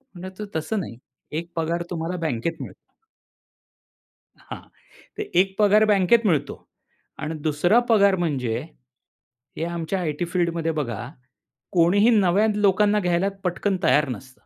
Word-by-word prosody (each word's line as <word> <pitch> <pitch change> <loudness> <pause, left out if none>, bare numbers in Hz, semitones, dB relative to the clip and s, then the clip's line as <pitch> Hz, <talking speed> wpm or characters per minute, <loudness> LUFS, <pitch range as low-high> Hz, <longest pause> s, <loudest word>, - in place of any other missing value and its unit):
म्हणलं 185 +2 -7
तो 210 - -4
तसं 200 +7 -2
नाही, 120 -10 -7 0.3
"एक 165 +3 -5
पगार 170 +1 -1
तुम्हाला 170 +1 -3
बँकेत 155 +6 -3
मिळतो." 445 - -13 1.4
हां, - - -9 0.6
"तर - - -3 0.2
1 195 0 0
पगार 210 +1 +5
बँकेत 205 +4 +3
मिळतो 145 -6 0 0.6
आणि 155 +1 -4
2रा 175 +10 +3
पगार 200 -3 +5
म्हणजे," 130 -9 -1 1.0
हे 160 - -2
आमच्या 170 +2 -3
आयटी 160 0 -2
फील्डमध्ये 170 -2 -1
बघा 120 -3 -4 0.6
"कोणीही 190 +5 +4
नव्या 195 +3 +3
लोकांना 210 +1 +3
घ्यायला 180 +1 +1
पटकन 185 +2 -1
तयार 150 -1 +3
नसतं." 125 +2 -7
175 Hz, 130 wpm, -23 LUFS, 160-200 Hz, 1.4 s, पगार